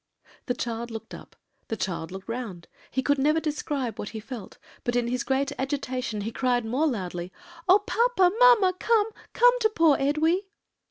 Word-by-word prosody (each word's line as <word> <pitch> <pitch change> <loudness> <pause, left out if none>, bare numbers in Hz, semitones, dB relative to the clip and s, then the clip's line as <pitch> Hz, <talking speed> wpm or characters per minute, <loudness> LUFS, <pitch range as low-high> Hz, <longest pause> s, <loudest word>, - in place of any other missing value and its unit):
"The 245 - 0
child 235 0 -4
looked 225 -1 -8
up, - - -11 0.3
the 225 - -3
child 175 -3 -3
looked 190 +1 -8
round, 230 -8 -5 0.2
he 260 - -1
could 285 0 +2
never 305 +4 +3
describe 290 -7 -3
what 205 - -4
he - - -4
felt; 220 -2 -9 0.3
but 240 - -1
in 240 -1 +1
his 250 +1 -1
great 270 +2 0
agitation 255 -5 -2
he 220 +3 -3
cried 245 -1 0
more 260 +8 +1
loudly, 180 - -4 0.4
'Oh, 375 - +9
papa! 440 -6 +3
mamma! 475 -7 +6
Come, 445 -1 +2 0.2
come - - +6
to 440 -2 +3
poor 330 -8 +4
Edwy!' 320 +7 +1
265 Hz, 175 wpm, -26 LUFS, 225-325 Hz, 0.4 s, Oh